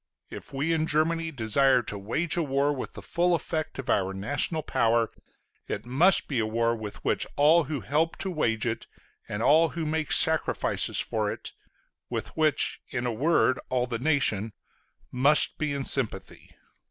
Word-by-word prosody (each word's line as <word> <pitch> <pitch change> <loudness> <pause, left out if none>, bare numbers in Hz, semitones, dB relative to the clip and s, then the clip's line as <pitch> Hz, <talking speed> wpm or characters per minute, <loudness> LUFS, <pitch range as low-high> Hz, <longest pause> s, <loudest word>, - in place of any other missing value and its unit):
If - - -8
we 145 +5 -1
in 160 -1 0
Germany 165 +2 0
desire 130 0 +2
to 100 - -5
wage 135 +12 -2
a 175 - +1
war 140 -1 +1
with 130 - -6
the - - -9
full 175 0 +1
effect 155 -2 -4
of 135 -1 -6
our 95 -4 0
national 145 - -1
power, 115 -1 +1 0.6
it 110 - -4
must 160 +10 +3
be 135 -5 -1
a 110 - +1
war 115 +1 0
with 110 -2 -8
which - - +1
all 155 +3 +4
who 150 -5 -4
help 150 +10 0
to 190 - -2
wage 115 -10 0
it, 115 -1 -3 0.4
and 105 +2 -3
all 160 +4 +5
who 165 0 -4
make 155 0 -2
sacrifices 160 0 +1
for 105 -2 -1
it - - -6 0.6
with - - -4
which, 155 -3 +1
in 125 -2 -3
a 120 - -1
word, 135 +1 +2
all 125 -1 0
the 120 -2 -4
nation 115 -7 +1 0.6
must 140 +4 +4
be 155 -1 -1
in 140 -1 -3
sympathy. 110 -8 -2
140 Hz, 175 wpm, -27 LUFS, 115-155 Hz, 0.6 s, all